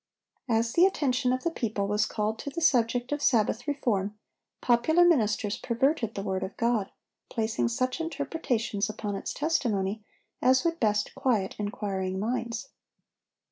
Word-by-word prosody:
As 230 0 +1
the 355 +2 +6
attention 255 -8 0
of 255 0 -1
the 335 - 0
people 215 -8 -2
was 210 +1 +1
called 215 +1 -2
to - - -4
the 285 - -4
subject 245 -4 +2
of 290 0 -1
Sabbath 230 -2 +2
reform, 210 -8 -1 0.4
popular 315 +9 +4
ministers 215 -10 +2
perverted 240 -1 0
the 195 - -3
word 190 -2 -2
of 190 - -5
God, 230 -4 +1 0.4
placing 225 +1 0
such 255 +5 -1
interpretations 275 -9 -2
upon 210 -1 -4
its - - -4
testimony 220 -9 0 0.4
as 260 +2 +4
would 335 0 0
best 210 -2 +1
quiet 220 -7 0
inquiring 195 -3 -2
minds. 235 +3 -3
230 Hz, 145 wpm, -28 LUFS, 210-265 Hz, 0.4 s, the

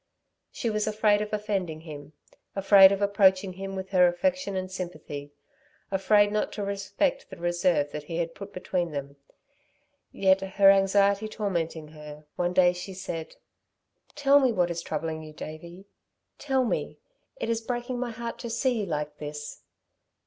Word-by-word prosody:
She 230 - -2
was 215 0 -1
afraid 210 -1 +3
of 210 - -4
offending 195 -7 -2
him, 150 -2 -10 0.4
afraid 195 -1 +7
of 200 0 0
approaching 195 -2 +3
him 195 +1 -6
with 190 0 -5
her 180 -2 +5
affection 265 +4 -1
and 185 0 -3
sympathy, 155 -6 -6 0.6
afraid 205 +2 +4
not 210 0 -1
to 205 - -4
respect 200 +7 -1
the - - -10
reserve 175 -4 +1
that 150 0 -6
he 165 +2 -5
had 165 -1 -2
put 200 0 -9
between 180 -2 -2
them. 140 0 -6 0.9
Yet 190 0 +3
her 195 +1 +5
anxiety 200 +2 +3
tormenting 170 -7 -3
her, 150 -1 -11
one 175 0 -1
day 180 -1 +5
she 180 +2 -7
said: 165 -3 -6 0.8
"Tell 285 -1 +5
me 260 -3 +3
what 180 -5 +1
is 170 0 -3
troubling 160 -1 -4
you, 155 -1 -10
Davey? 170 +5 -9 0.5
Tell 265 -3 +1
me. - - -2 0.4
It - - -4
is 230 0 -1
breaking 240 +1 -3
my 250 -1 -2
heart 230 0 -6
to 235 - -5
see 235 +1 0
you 205 - -1
like 150 -2 -4
this." 150 0 -7
190 Hz, 165 wpm, -27 LUFS, 165-210 Hz, 0.9 s, afraid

